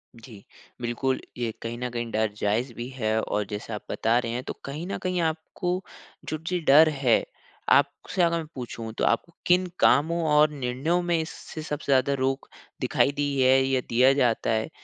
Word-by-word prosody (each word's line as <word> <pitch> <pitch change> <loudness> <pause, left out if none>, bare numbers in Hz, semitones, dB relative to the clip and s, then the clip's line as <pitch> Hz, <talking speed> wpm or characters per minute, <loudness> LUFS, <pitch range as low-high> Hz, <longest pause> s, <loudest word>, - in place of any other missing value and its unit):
जी। 115 -3 -13 0.4
बिल्कुल, 125 +2 -1 0.2
ये 120 -2 -1
कहीं 115 +1 -5
न 125 +1 -3
कहीं 120 -1 -4
डर 110 -1 0
जायज़ 115 +5 0
भी 120 +2 -6
है। 110 -4 -1
और 105 -1 -2
जैसे 105 +2 -5
आप 105 - -5
बता 115 +2 +2
रहे 115 -2 -3
हैं 125 +2 -3
तो - - -5
कहीं 150 +5 -5
न - - -3
कहीं 185 -1 0
आपको 175 +3 -2 0.5
जो 155 - -2
जी 180 -1 0
डर 155 +3 +8
है 135 -6 +2 0.5
आपसे 180 - +2
अगर 170 0 +2
मैं 165 - -4
पूछूँ 115 -3 -6
तो - - -1
आपको 140 +9 0
किन 180 +1 +4
कामों 160 +6 +4
और 150 +1 +6
निर्णयों 140 +5 -1
में 175 -1 +1
इससे 160 0 -7
सबसे 150 -2 -3
ज़्यादा 135 +1 +3
रोक 135 +1 -1 0.3
दिखाई 140 - +2
दी 145 0 -1 0.2
है 130 +1 +5
या 130 -1 +1
दिया 130 +3 +5
जाता 125 -5 +1
है? 110 +3 0
130 Hz, 190 wpm, -26 LUFS, 120-155 Hz, 0.5 s, डर